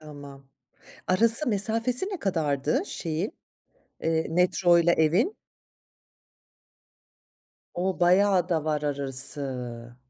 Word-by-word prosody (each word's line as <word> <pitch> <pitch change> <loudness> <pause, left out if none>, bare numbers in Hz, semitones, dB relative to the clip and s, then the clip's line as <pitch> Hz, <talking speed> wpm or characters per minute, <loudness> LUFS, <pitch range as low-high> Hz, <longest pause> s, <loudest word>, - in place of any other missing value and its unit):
Tamam. 145 -3 -12 0.6
Arası, 230 +8 +3
mesafesi 230 - 0
ne 385 -4 -5
kadardı, 165 - -1
şeyin, 170 - -4 0.7
eee, 160 0 -1
metroyla 175 0 +3
evin? 175 - +1 2.4
O 185 +1 -3
bayağı 185 0 +3
da 160 -3 -1
var 150 -1 -1
arası. 130 -4 -2
170 Hz, 85 wpm, -26 LUFS, 145-200 Hz, 2.4 s, Arası